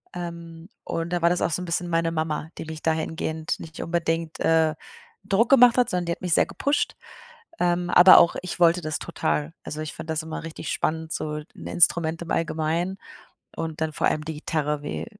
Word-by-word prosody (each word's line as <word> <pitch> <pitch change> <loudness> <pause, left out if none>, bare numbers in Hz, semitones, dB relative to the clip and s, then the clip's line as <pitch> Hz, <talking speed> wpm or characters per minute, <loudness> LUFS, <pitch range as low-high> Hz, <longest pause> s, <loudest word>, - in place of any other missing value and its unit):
ähm, 170 0 -7
und 165 +1 -3
da 175 -1 0
war 170 - +4
das 180 - 0
auch - - +1
so 180 - -1
'n - - -5
bisschen 175 +1 -2
meine 165 -1 0
Mama, 155 -1 -2
die - - -6
mich 160 0 -7
dahingehend 160 0 -2
nicht 160 -1 -10
unbedingt, 165 -1 -2
äh, 160 -1 +3 0.5
Druck 215 +4 +2
gemacht 245 -2 +7
hat, 250 - +3
sondern 180 -1 -1
die - - 0
hat - - -11
mich 180 -2 0
sehr - - +4
gepusht. 285 +1 -1 0.6
Ähm, 175 0 +1
aber 180 +1 +9
auch 170 - +4
ich 180 -1 -6
wollte 175 +1 +4
das 155 -2 -2
total. 75 0 -2
Also, 155 +1 -6
ich 155 - -5
fand 160 0 -9
das 160 0 -1
immer 160 0 -6
richtig 160 -2 -6
spannend, 160 0 -2
so 150 - -3 0.2
'n - - -9
Instrument 165 -1 +2
im 165 - -8
Allgemeinen 165 +3 -1 0.6
und 160 -1 -5
dann 160 -1 0
vor - - +1
allem 150 - -1
die 160 -1 -4
Gitarre 150 -1 -2
wie, 145 - -4
165 Hz, 205 wpm, -25 LUFS, 155-175 Hz, 0.6 s, aber